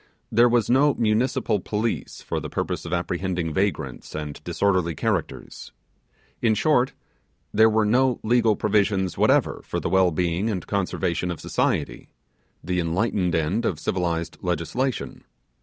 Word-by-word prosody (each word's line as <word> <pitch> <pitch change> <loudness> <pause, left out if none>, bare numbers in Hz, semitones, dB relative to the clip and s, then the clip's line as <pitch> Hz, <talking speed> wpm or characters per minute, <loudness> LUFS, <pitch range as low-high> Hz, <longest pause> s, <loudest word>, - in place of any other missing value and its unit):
There 120 +2 +5
was 120 -3 +2
no 140 +3 +4
municipal 110 -1 +1
police 110 +4 -3
for - - -2
the - - -6
purpose - - -3
of 85 - -6
apprehending 90 -1 -2
vagrants 95 -5 -2
and 75 -2 -6
disorderly 90 -5 0
characters. - - -3 0.7
In 110 -2 +3
short, 135 -1 +2 0.6
there 110 +1 +6
were 110 0 +2
no 125 +3 +2
legal 115 -1 +3
provisions 100 -3 +1
whatever - - +2
for - - -3
the - - -2
well 95 -1 +4
being 90 +5 -1
and 95 -6 -3
conservation 90 -3 -1
of 85 - -4
society, - - -1 0.5
the 90 +2 -1
enlightened 90 +1 0
end 80 +8 0
of 80 - -1
civilized 85 -2 -2
legislation. 90 - -2
100 Hz, 140 wpm, -24 LUFS, 85-115 Hz, 0.7 s, there